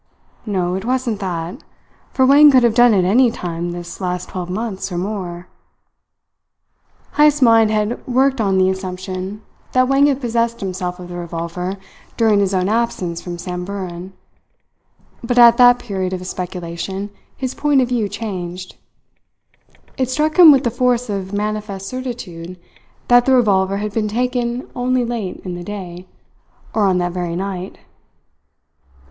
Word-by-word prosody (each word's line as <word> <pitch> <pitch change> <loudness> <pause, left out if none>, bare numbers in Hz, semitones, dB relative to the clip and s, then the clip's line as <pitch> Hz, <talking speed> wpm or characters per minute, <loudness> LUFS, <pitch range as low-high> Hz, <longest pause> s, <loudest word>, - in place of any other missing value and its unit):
"No, 180 -3 -1
it 190 +1 -3
wasn't 245 -3 -1
that. 180 - -5 0.5
For 260 - +3
Wang 290 +3 +8
could 260 -3 +5
have 235 -2 +3
done 240 +1 +6
it 185 -2 +2
any 240 +7 +4
time 175 -5 -4
this 175 +2 -8
last 180 0 -3
twelve 180 -1 -5
months 200 0 -4
or 175 - -3
more 180 -2 -4 0.8
" - - -41
Heyst's 295 -1 +5
mind 225 -2 +5
had 215 +2 -1
worked 265 0 +2
on 195 -2 +1
the 185 0 +4
assumption 190 +2 -6 0.3
that 255 0 +3
Wang 275 +2 +4
had 275 -2 +1
possessed 235 -2 -1
himself 180 -2 -4
of 180 - -8
the 175 - -6
revolver 175 +2 -4 0.4
during 220 -3 +3
his 195 -1 +1
own 185 -1 0
absence 205 -6 -1
from 175 -1 -6
Samburan; 180 0 -6 1.1
but 245 +1 -1
at 235 -1 +8
that 245 0 +7
period 190 -6 -4
of 185 - -3
his 180 +1 -6
speculation 180 +2 -5 0.3
his 260 -1 -3
point 290 -2 +2
of 250 -2 +1
view 230 -5 0
changed. 185 -4 -6 1.2
It 260 -1 0
struck 305 +5 0
him 335 -4 +11
with 270 -3 +4
the 235 - 0
force 250 -1 0
of 190 -1 -4
manifest 205 -1 -3
certitude 190 -9 -7 0.5
that 245 0 +5
the 265 - +5
revolver 195 -5 +2
had 210 0 -4
been 215 -1 0
taken 245 +2 -2
only 250 0 0
late 230 -6 -4
in 180 - -4
the 175 0 -6
day, 185 -2 -8 0.7
or 215 -2 +2
on 185 -1 +2
that 175 0 -1
very 175 -1 -3
night. 190 0 -5
200 Hz, 160 wpm, -19 LUFS, 180-245 Hz, 1.2 s, him